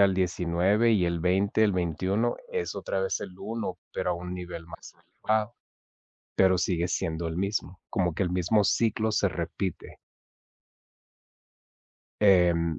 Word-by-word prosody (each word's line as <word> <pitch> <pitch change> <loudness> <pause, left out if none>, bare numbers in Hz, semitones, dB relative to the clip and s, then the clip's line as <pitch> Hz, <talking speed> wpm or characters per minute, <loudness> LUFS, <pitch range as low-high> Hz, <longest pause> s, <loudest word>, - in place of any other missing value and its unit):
al 100 -1 +5
19, 90 +5 +2
y 95 -5 +3
el 85 -1 -1
20, 95 +4 +2
el 105 -2 +4
21 95 +6 0
es 460 -2 -2
otra - - -2
vez 485 -1 -1
el 90 - -8
1, 110 -5 -4
pero - - -1
a - - +1
un 90 +1 -6
nivel 85 -2 -7
más - - -12
elevado. 110 +1 -2 0.8
Pero 95 -1 +4
sigue 85 -1 0
siendo 80 0 -2
el 80 +1 -4
mismo, 100 -1 -2
como 90 -3 0
que 85 - 0
el 90 - -1
mismo 90 +4 +2
ciclo 110 +2 +1
se 100 -2 +2
repite. 90 +1 -4 2.3
Em, 85 -5 +4
90 Hz, 145 wpm, -27 LUFS, 85-105 Hz, 2.3 s, al